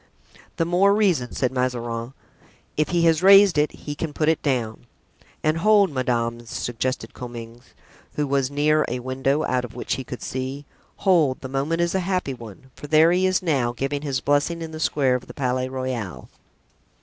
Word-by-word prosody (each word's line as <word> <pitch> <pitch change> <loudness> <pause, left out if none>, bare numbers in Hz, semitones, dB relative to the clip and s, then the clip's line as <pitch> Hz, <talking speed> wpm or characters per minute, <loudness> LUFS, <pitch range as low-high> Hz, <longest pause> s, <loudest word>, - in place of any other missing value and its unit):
"The 165 - 0
more 190 +4 +3
reason," 180 - +1
said 130 - 0
Mazarin; 120 -1 -2 0.6
"if 155 - 0
he 175 -1 +1
has 165 -1 +3
raised 195 -1 +7
it 150 - +2
he 145 - -7
can 150 +1 -5
put 155 +1 +1
it 160 - +1
down." 120 -4 -2 0.6
"And 155 +1 +1
hold, 205 0 +4
madame," 120 -3 -1
suggested 120 +3 -3
Comminges, 120 -1 -10 0.4
who 150 - 0
was 135 -2 0
near 150 +2 +2
a 125 - -2
window, 135 +4 -1
out 125 -3 0
of 125 - -8
which 125 - -2
he 130 - -5
could 125 -1 -8
see; 130 +2 -4 0.3
"hold, 165 -9 +2
the 130 - -6
moment 145 +5 -1
is 170 0 0
a 190 - +1
happy 180 -6 -1
one, 120 +1 -12
for 145 - -10
there 155 +2 +5
he 185 +1 +3
is 185 0 +1
now, 135 -8 +1
giving 135 +3 -3
his 140 -3 -2
blessing 145 +4 +1
in 160 - -7
the 155 - -7
square 140 -4 +1
of 125 0 -3
the - - -11
Palais 130 -1 -1
Royal." 130 -7 -4
140 Hz, 185 wpm, -23 LUFS, 125-165 Hz, 0.6 s, raised